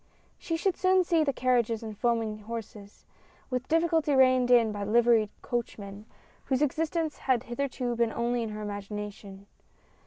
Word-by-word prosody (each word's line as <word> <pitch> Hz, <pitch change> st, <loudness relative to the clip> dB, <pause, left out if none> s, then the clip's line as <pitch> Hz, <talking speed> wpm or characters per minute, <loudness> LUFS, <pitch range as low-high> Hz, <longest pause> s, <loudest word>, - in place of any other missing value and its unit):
She 330 Hz, -, -2 dB
should 370 Hz, +2 st, 0 dB
soon 370 Hz, 0 st, +3 dB
see 335 Hz, -2 st, +2 dB
the 285 Hz, -, +1 dB
carriages 240 Hz, -4 st, +1 dB
and 215 Hz, -1 st, -6 dB
foaming 225 Hz, -1 st, -1 dB
horses, 215 Hz, -2 st, -9 dB, 0.5 s
with 255 Hz, 0 st, -2 dB
difficulty 325 Hz, -2 st, +2 dB
reined 255 Hz, -1 st, +4 dB
in 235 Hz, -3 st, +5 dB
by 205 Hz, -1 st, -4 dB
liveried 225 Hz, 0 st, +3 dB
coachmen, 210 Hz, -3 st, -5 dB, 0.4 s
whose 265 Hz, +1 st, +1 dB
existence 315 Hz, +2 st, -1 dB
had 250 Hz, -2 st, +3 dB
hitherto 250 Hz, -1 st, -3 dB
been 230 Hz, -1 st, +1 dB
only 240 Hz, +1 st, -1 dB
in 225 Hz, -, -3 dB
her 210 Hz, 0 st, -6 dB
imagination. 205 Hz, -1 st, -7 dB
240 Hz, 150 wpm, -28 LUFS, 215-270 Hz, 0.5 s, in